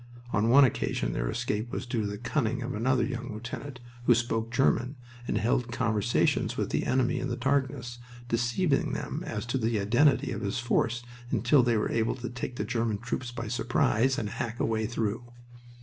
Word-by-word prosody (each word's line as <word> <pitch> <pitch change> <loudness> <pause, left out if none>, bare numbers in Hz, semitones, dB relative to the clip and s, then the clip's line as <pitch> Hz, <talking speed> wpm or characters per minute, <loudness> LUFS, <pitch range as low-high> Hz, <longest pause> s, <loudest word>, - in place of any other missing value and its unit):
On 105 +2 +2
one 140 +4 +8
occasion 130 - 0
their - - -1
escape 110 +3 -2
was - - -3
due 120 -2 -1
to 105 - -1
the 100 0 -4
cunning 120 +1 -1
of 125 +2 -3
another 125 +2 +2
young 125 -1 -4
lieutenant, 120 +4 -6 0.3
who 120 - +6
spoke 115 -1 -1
German 125 +1 +2 0.3
and - - 0
held 120 +3 +1
conversations 115 -5 +1
with - - -1
the - - 0
enemy 130 -1 +2
in 130 - -2
the 120 - -2
darkness, 130 -1 -1 0.3
deceiving 120 +7 +1
them - - -3
as 105 +2 -3
to 120 +3 -1
the 110 -2 +1
identity 125 +8 +3
of 105 - -4
his 100 +2 -2
force 120 -1 0 0.3
until 125 +4 +4
they 120 -2 +2
were 105 - 0
able 115 0 +1
to 125 -1 -6
take 125 0 -5
the - - -2
German 115 -3 0
troops 120 +3 -4
by 115 -2 -5
surprise 120 +1 +2
and 105 - -2
hack 120 +1 -4
a - - +2
way 110 -1 0
through. 115 +1 -3
120 Hz, 195 wpm, -28 LUFS, 110-125 Hz, 0.3 s, one